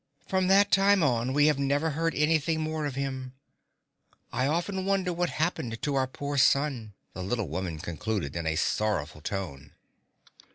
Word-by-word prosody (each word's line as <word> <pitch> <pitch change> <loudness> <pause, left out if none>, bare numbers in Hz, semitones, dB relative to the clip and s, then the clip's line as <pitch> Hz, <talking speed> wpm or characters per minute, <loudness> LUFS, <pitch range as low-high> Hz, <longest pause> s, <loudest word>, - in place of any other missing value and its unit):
From 185 -1 +1
that 200 +2 +5
time 195 -1 +5
on 125 -3 +1
we 145 +2 +4
have 150 -2 +3
never 145 +3 +1
heard 165 +2 -1
anything 160 +1 +2
more 155 -1 -2
of 140 - -5
him. 130 -2 -4 1.0
I 130 +3 +1
often 175 +5 -1
wonder 190 -2 0
what 175 0 0
happened 130 -8 -2
to 145 - -2
our 135 -1 +1
poor 140 +2 -3
son," 130 -7 +2 0.2
the 95 - -6
little 110 +3 -2
woman 90 -4 -3
concluded 85 0 -3
in 85 -2 -2
a 80 - 0
sorrowful 85 -4 -1
tone. 75 -6 -5
140 Hz, 165 wpm, -28 LUFS, 105-160 Hz, 1.0 s, that